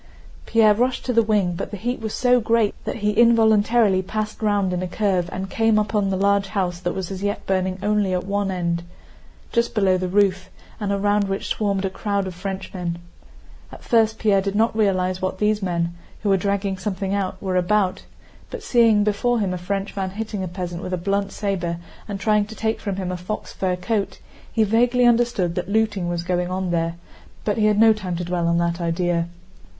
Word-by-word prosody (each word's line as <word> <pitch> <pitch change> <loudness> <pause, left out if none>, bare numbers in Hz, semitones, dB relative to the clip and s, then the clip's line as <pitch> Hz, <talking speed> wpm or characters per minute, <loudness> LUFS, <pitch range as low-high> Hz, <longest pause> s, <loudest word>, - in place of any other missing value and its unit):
Pierre 220 -2 +5
rushed 250 +4 0
to 250 - 0
the 230 - +5
wing, 210 -5 +1
but 170 - -4
the 205 - -6
heat 245 +6 -3
was 220 -1 -3
so 250 0 +4
great 225 -2 +2
that - - -3
he 210 - +3
involuntarily 220 -2 +4
passed 215 +3 -4
round 205 -3 +1
in 180 - -1
a 185 - -2
curve 185 -2 0
and 190 +1 -4
came 225 +2 +2
upon 210 -1 +1
the 190 - 0
large 200 0 +2
house 185 -4 -2
that 175 -1 -3
was 190 -1 -4
as 190 -1 -5
yet 205 +1 -2
burning 185 -1 0
only 210 -2 +1
at 180 0 -1
one 200 0 -1
end, 170 -2 -1 0.7
just 235 0 0
below 190 -3 +3
the 185 - -2
roof, 190 0 +1 0.3
and 205 -2 -2
around 205 +1 +2
which 195 0 -3
swarmed 200 -2 0
a - - 0
crowd 200 0 -1
of 185 - -5
Frenchmen. 185 -2 -5 0.7
At - - -12
first 225 -2 +2
Pierre 200 -3 +3
did 200 +1 -3
not 220 +1 +2
realize 185 -4 +1
what 185 0 -2
these 210 +1 +1
men, 170 -2 -1 0.3
who 205 - +1
were 195 - +5
dragging 195 0 -1
something 195 -1 -2
out, 195 -1 -2
were 190 -2 -2
about; 185 +1 +1 0.5
but 475 -3 -7
seeing 230 - +4
before 215 +4 +1
him 195 -3 0
a - - -2
Frenchman 195 +1 -3
hitting 210 0 -4
a - - -3
peasant 175 -1 -5
with 185 - -5
a - - +1
blunt 200 +2 -1
saber 180 -5 -2 0.3
and 200 -2 -4
trying 210 +1 +2
to 220 +1 -10
take 220 +2 -1
from 200 -3 -3
him 185 -1 -3
a 180 - -3
fox 180 +4 -5
fur 185 -1 -1
coat, 200 +3 -2 0.3
he 225 - +2
vaguely 240 +4 +3
understood 235 -7 +2
that 180 +2 -4
looting 210 -4 +1
was 170 -1 -2
going 180 0 -1
on 185 -1 -2
there, 165 0 0 0.5
but 210 +1 0
he 215 - +4
had 210 -1 +2
no 225 0 +7
time 185 -5 -4
to 175 - -3
dwell 175 -1 -1
on 170 0 +2
that 170 0 0
idea. 170 0 0
195 Hz, 210 wpm, -22 LUFS, 185-215 Hz, 0.7 s, no